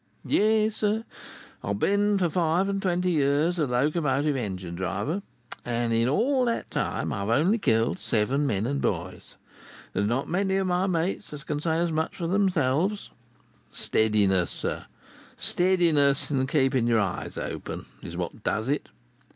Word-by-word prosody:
"Yes, 215 Hz, 0 st, +2 dB
sir, 215 Hz, +2 st, 0 dB, 0.6 s
I -, -, -6 dB
have 100 Hz, 0 st, -1 dB
been 205 Hz, -, +2 dB
for 180 Hz, -2 st, +2 dB
five 170 Hz, +3 st, +1 dB
and 195 Hz, 0 st, -1 dB
twenty 180 Hz, -1 st, +1 dB
years 150 Hz, +3 st, +2 dB
a 150 Hz, -, +2 dB
Locomotive 145 Hz, +2 st, +1 dB
Engine 95 Hz, -8 st, -4 dB
driver; 95 Hz, -, -2 dB, 0.4 s
and 120 Hz, -1 st, -1 dB
in 115 Hz, +2 st, +2 dB
all 255 Hz, -, +2 dB
that 235 Hz, -1 st, -2 dB
time, -, -, -2 dB
I've 100 Hz, +1 st, -3 dB
only 165 Hz, -, +3 dB
killed 115 Hz, -, +1 dB
seven 130 Hz, +6 st, +1 dB
men 105 Hz, -3 st, 0 dB
and 140 Hz, +3 st, -1 dB
boys. 90 Hz, 0 st, -3 dB, 0.6 s
There's 100 Hz, -, 0 dB
not 125 Hz, +5 st, -1 dB
many 190 Hz, +2 st, 0 dB
of 195 Hz, 0 st, +1 dB
my 180 Hz, +1 st, +1 dB
mates 180 Hz, +3 st, -1 dB
as 150 Hz, 0 st, -7 dB
can 150 Hz, -, -3 dB
say 160 Hz, 0 st, 0 dB
as 170 Hz, 0 st, 0 dB
much 160 Hz, +1 st, -1 dB
for 170 Hz, -, -4 dB
themselves. 185 Hz, 0 st, +1 dB, 0.6 s
Steadiness, 100 Hz, -5 st, +2 dB
sir—steadiness 165 Hz, -7 st, 0 dB
and 130 Hz, -2 st, 0 dB
keeping 130 Hz, -5 st, +2 dB
your 115 Hz, -1 st, +3 dB
eyes 95 Hz, -4 st, -3 dB
open, -, -, -5 dB, 0.2 s
is -, -, -7 dB
what -, -, -5 dB
does 110 Hz, +4 st, -1 dB
it. 145 Hz, -, -1 dB
150 Hz, 155 wpm, -26 LUFS, 115-185 Hz, 0.6 s, only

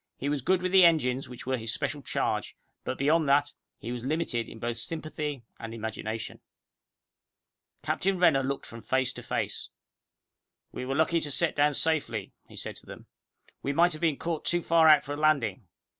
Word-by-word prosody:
He 140 Hz, -, -2 dB
was 145 Hz, -2 st, -1 dB
good 180 Hz, +6 st, +1 dB
with 185 Hz, -, 0 dB
the 190 Hz, -1 st, +7 dB
engines 135 Hz, -6 st, +3 dB
which 125 Hz, -, -10 dB
were 130 Hz, 0 st, 0 dB
his 110 Hz, 0 st, -4 dB
special 145 Hz, +2 st, -3 dB
charge, -, -, -2 dB, 0.3 s
but -, -, -3 dB
beyond 150 Hz, +2 st, +2 dB
that, 145 Hz, +1 st, +3 dB, 0.2 s
he 115 Hz, -, -6 dB
was 120 Hz, -1 st, -5 dB
limited 135 Hz, -5 st, -1 dB
in -, -, -10 dB
both 120 Hz, +1 st, -3 dB
sympathy 150 Hz, -1 st, -4 dB, 0.2 s
and 115 Hz, 0 st, -6 dB
imagination. 110 Hz, 0 st, -5 dB, 1.4 s
Captain 195 Hz, 0 st, 0 dB
Renner 160 Hz, -6 st, +5 dB
looked 135 Hz, +1 st, -3 dB
from 115 Hz, 0 st, -10 dB
face 130 Hz, +1 st, 0 dB
to -, -, -9 dB
face. -, -, -3 dB, 1.0 s
"We 125 Hz, -, -5 dB
were 135 Hz, -, -1 dB
lucky 160 Hz, +2 st, +3 dB
to 150 Hz, -, -3 dB
set 165 Hz, +4 st, +1 dB
down 145 Hz, 0 st, +3 dB
safely," 160 Hz, 0 st, 0 dB
he -, -, -14 dB
said -, -, -7 dB
to -, -, -19 dB
them -, -, -9 dB, 0.4 s
all. -, -, -26 dB
"We 140 Hz, -, -1 dB
might 175 Hz, +4 st, +4 dB
have 155 Hz, -, -8 dB
been 160 Hz, -4 st, +2 dB
caught 165 Hz, -2 st, -3 dB
too 175 Hz, 0 st, 0 dB
far 165 Hz, -1 st, +5 dB
out 150 Hz, -2 st, +7 dB
for 145 Hz, -, -5 dB
a -, -, -5 dB
landing. 130 Hz, -10 st, +1 dB
145 Hz, 195 wpm, -28 LUFS, 125-160 Hz, 1.4 s, the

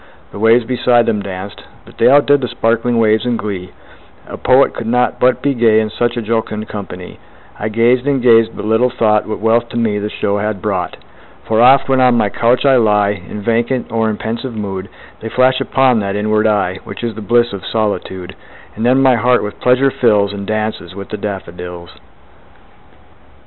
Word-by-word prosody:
The -, -, -9 dB
waves 115 Hz, +2 st, +3 dB
beside 120 Hz, -1 st, +2 dB
them 110 Hz, -3 st, -1 dB
danced; 100 Hz, 0 st, -8 dB, 0.2 s
but -, -, -17 dB
they -, -, +5 dB
Outdid 145 Hz, +1 st, +4 dB
the 125 Hz, -, -2 dB
sparkling 115 Hz, +1 st, 0 dB
waves 110 Hz, -1 st, +2 dB
in 120 Hz, -1 st, -1 dB
glee; 95 Hz, -4 st, -5 dB, 0.6 s
A -, -, -7 dB
poet 130 Hz, +2 st, +3 dB
could 115 Hz, -, -6 dB
not 125 Hz, +1 st, 0 dB
but 125 Hz, 0 st, +2 dB
be 140 Hz, -, +1 dB
gay, 115 Hz, -3 st, +3 dB
In 110 Hz, -1 st, -2 dB
such 120 Hz, +1 st, -1 dB
a 120 Hz, -, -2 dB
jocund 110 Hz, -1 st, -3 dB
company; 95 Hz, -3 st, -8 dB, 0.4 s
I 110 Hz, -, -3 dB
gazed 120 Hz, +4 st, +1 dB
and 140 Hz, -2 st, +1 dB
gazed 115 Hz, -2 st, +3 dB
but -, -, -6 dB
little 110 Hz, +3 st, +2 dB
thought 110 Hz, -4 st, +1 dB
What 110 Hz, -, -4 dB
wealth 115 Hz, +1 st, +1 dB
to -, -, -6 dB
me 110 Hz, -3 st, 0 dB
the 105 Hz, +1 st, -4 dB
show 100 Hz, -1 st, -2 dB
had 105 Hz, -1 st, -3 dB
brought: 95 Hz, -4 st, -3 dB, 0.5 s
For 110 Hz, 0 st, +1 dB
oft, 130 Hz, +3 st, +5 dB
when 135 Hz, -1 st, +2 dB
on 125 Hz, -2 st, +4 dB
my 105 Hz, -, +1 dB
couch 120 Hz, +6 st, +1 dB
I 135 Hz, -2 st, +5 dB
lie 105 Hz, -3 st, +2 dB
In 105 Hz, +1 st, -8 dB
vacant 120 Hz, +3 st, -1 dB
or 115 Hz, -1 st, 0 dB
in 105 Hz, -, -3 dB
pensive 115 Hz, +2 st, -5 dB
mood, 100 Hz, -2 st, -5 dB, 0.3 s
They 115 Hz, -, -6 dB
flash 130 Hz, +2 st, +2 dB
upon 130 Hz, -3 st, +2 dB
that 100 Hz, -1 st, -3 dB
inward 105 Hz, +1 st, +1 dB
eye 100 Hz, -3 st, 0 dB
Which -, -, -9 dB
is 115 Hz, -1 st, -2 dB
the 110 Hz, -, -9 dB
bliss 120 Hz, +1 st, +1 dB
of 100 Hz, -, -7 dB
solitude; 95 Hz, -4 st, -3 dB, 0.4 s
And 110 Hz, -, -5 dB
then 130 Hz, +3 st, +3 dB
my 130 Hz, -2 st, +4 dB
heart 125 Hz, +2 st, +2 dB
with 105 Hz, -, -7 dB
pleasure 130 Hz, +2 st, +3 dB
fills, 105 Hz, -5 st, +1 dB
And 100 Hz, -1 st, -7 dB
dances 110 Hz, -4 st, -3 dB
with 100 Hz, -1 st, -9 dB
the 105 Hz, -, -5 dB
daffodils. 90 Hz, -4 st, -7 dB
110 Hz, 200 wpm, -15 LUFS, 105-120 Hz, 0.6 s, they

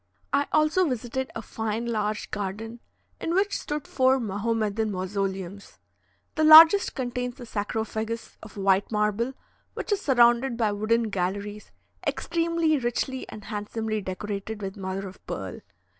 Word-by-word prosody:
I 280 Hz, +1 st, +2 dB
also 310 Hz, +3 st, +3 dB
visited 255 Hz, +1 st, -3 dB
a -, -, -5 dB
fine 220 Hz, +1 st, -3 dB
large 215 Hz, -2 st, -2 dB
garden, 210 Hz, +4 st, -4 dB, 0.4 s
in 335 Hz, -, -1 dB
which 400 Hz, +1 st, +2 dB
stood 295 Hz, -1 st, -4 dB
four 260 Hz, 0 st, +3 dB
Mahomedan 220 Hz, 0 st, -1 dB
mausoleums. 195 Hz, 0 st, -4 dB, 0.6 s
The 310 Hz, -, 0 dB
largest 320 Hz, +5 st, +9 dB
contains 250 Hz, 0 st, -3 dB
a 245 Hz, -, -7 dB
sarcophagus 220 Hz, +1 st, -3 dB
of 215 Hz, -1 st, -12 dB
white 195 Hz, +1 st, +2 dB
marble, 210 Hz, +4 st, 0 dB, 0.4 s
which -, -, -5 dB
is 410 Hz, -1 st, +1 dB
surrounded 240 Hz, -1 st, +4 dB
by 220 Hz, -3 st, +2 dB
wooden 215 Hz, +2 st, 0 dB
galleries 200 Hz, +3 st, -3 dB, 0.4 s
extremely 335 Hz, -2 st, +1 dB
richly 255 Hz, +2 st, -2 dB
and 210 Hz, -, -10 dB
handsomely 215 Hz, +1 st, -3 dB
decorated 200 Hz, +3 st, -5 dB
with 195 Hz, 0 st, -4 dB
mother 195 Hz, 0 st, -4 dB
of 190 Hz, -, -13 dB
pearl. -, -, -5 dB
225 Hz, 135 wpm, -26 LUFS, 205-260 Hz, 0.6 s, largest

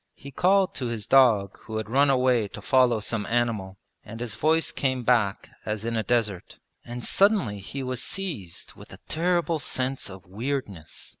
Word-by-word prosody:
He 140 Hz, -, -11 dB
called 190 Hz, +6 st, +3 dB
to 125 Hz, -, -3 dB
his 115 Hz, -3 st, -4 dB
dog 115 Hz, -8 st, +4 dB
who 110 Hz, -, -4 dB
had 110 Hz, -1 st, -3 dB
run 140 Hz, +5 st, +3 dB
away 125 Hz, -4 st, +3 dB
to -, -, -10 dB
follow 125 Hz, -4 st, +3 dB
some 105 Hz, 0 st, -2 dB
animal, 115 Hz, -5 st, -1 dB, 0.3 s
and 115 Hz, +1 st, -9 dB
his 120 Hz, -3 st, -3 dB
voice 155 Hz, +9 st, +1 dB
came 130 Hz, -2 st, -1 dB
back 115 Hz, -5 st, +1 dB
as 105 Hz, 0 st, -3 dB
in 115 Hz, 0 st, -1 dB
a 110 Hz, -, +1 dB
desert. 110 Hz, -6 st, -1 dB, 0.3 s
And 120 Hz, 0 st, -7 dB
suddenly 195 Hz, -, +3 dB
he 135 Hz, +7 st, -6 dB
was 125 Hz, -1 st, -2 dB
seized 145 Hz, -, -4 dB
with -, -, -14 dB
a -, -, -12 dB
terrible 170 Hz, 0 st, 0 dB
sense 130 Hz, -3 st, -2 dB
of 95 Hz, -1 st, -11 dB
weirdness. 105 Hz, -, -5 dB
120 Hz, 175 wpm, -26 LUFS, 105-135 Hz, 0.3 s, dog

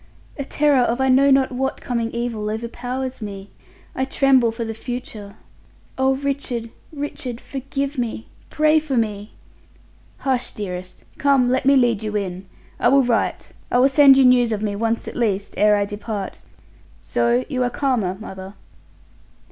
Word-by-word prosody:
"A 280 Hz, -, -4 dB
terror 290 Hz, 0 st, +2 dB
of 240 Hz, +1 st, 0 dB
I 265 Hz, 0 st, +2 dB
know 270 Hz, +2 st, +5 dB
not 270 Hz, -1 st, +4 dB
what 265 Hz, +1 st, -2 dB
coming 235 Hz, -2 st, -2 dB
evil 235 Hz, -3 st, -3 dB
overpowers 245 Hz, +3 st, -4 dB
me. 200 Hz, -2 st, -7 dB, 0.4 s
I 260 Hz, -, 0 dB
tremble 265 Hz, -2 st, +3 dB
for 230 Hz, 0 st, -5 dB
the 225 Hz, -, -4 dB
future. 220 Hz, -3 st, -7 dB, 0.6 s
Oh, 265 Hz, 0 st, +2 dB
Richard, 265 Hz, -4 st, -3 dB, 0.2 s
Richard! 280 Hz, -5 st, -5 dB
Forgive 275 Hz, +1 st, -4 dB
me! 230 Hz, -2 st, -3 dB, 0.2 s
Pray 310 Hz, 0 st, +3 dB
for 295 Hz, -4 st, -3 dB
me." 210 Hz, -2 st, -2 dB, 0.8 s
"Hush, 260 Hz, -2 st, -1 dB
dearest! 185 Hz, -3 st, -7 dB, 0.2 s
Come, 270 Hz, -3 st, +3 dB
let 260 Hz, +2 st, +1 dB
me 275 Hz, -, +6 dB
lead 240 Hz, -5 st, +3 dB
you 215 Hz, -1 st, -4 dB
in. 185 Hz, -1 st, -5 dB, 0.3 s
I -, -, +3 dB
will 275 Hz, +2 st, +5 dB
write. 240 Hz, -2 st, -1 dB, 0.2 s
I -, -, +2 dB
will 260 Hz, +2 st, +5 dB
send 275 Hz, -1 st, +7 dB
you 270 Hz, -, +6 dB
news 245 Hz, -2 st, +4 dB
of 215 Hz, -1 st, -2 dB
me 205 Hz, -1 st, -1 dB
once 225 Hz, +2 st, -1 dB
at -, -, -7 dB
least, 205 Hz, -4 st, -1 dB
ere 210 Hz, 0 st, +4 dB
I 205 Hz, 0 st, +1 dB
depart. 205 Hz, -1 st, -6 dB, 0.6 s
So 120 Hz, +1 st, +1 dB
you 255 Hz, -, -2 dB
are 245 Hz, -, +2 dB
calmer, 240 Hz, -9 st, -1 dB
mother!" 190 Hz, -2 st, -9 dB
240 Hz, 165 wpm, -21 LUFS, 210-265 Hz, 0.8 s, send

